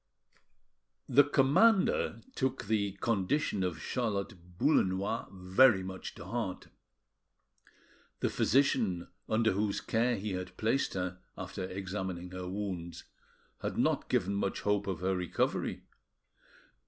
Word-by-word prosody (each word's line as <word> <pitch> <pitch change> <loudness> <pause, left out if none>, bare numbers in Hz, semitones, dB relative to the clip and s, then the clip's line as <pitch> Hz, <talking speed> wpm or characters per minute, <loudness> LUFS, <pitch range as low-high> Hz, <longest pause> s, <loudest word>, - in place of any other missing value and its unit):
The 140 +2 +6
commander 195 - +3
took 130 - -1
the 100 -2 0
condition 105 +2 0
of 90 -4 -2
Charlotte 100 -4 -3
Boullenois 100 -4 +1
very 95 +3 +4
much 95 0 -7
to - - -9
heart. 110 -6 -4 1.5
The - - +1
physician 115 -10 +2 0.2
under 110 0 +3
whose 100 +1 0
care 120 +2 +1
he 100 +1 -4
had 90 0 -5
placed 115 +3 0
her, 90 -1 -3 0.2
after 95 - -5
examining 95 -1 -4
her 90 -1 -5
wounds, 95 -4 -4 0.6
had - - -3
not - - +1
given 95 +2 +1
much 100 -1 -1
hope 105 -1 +1
of 90 -3 -3
her 95 +1 +1
recovery. 90 -1 -1
100 Hz, 115 wpm, -32 LUFS, 90-115 Hz, 1.5 s, The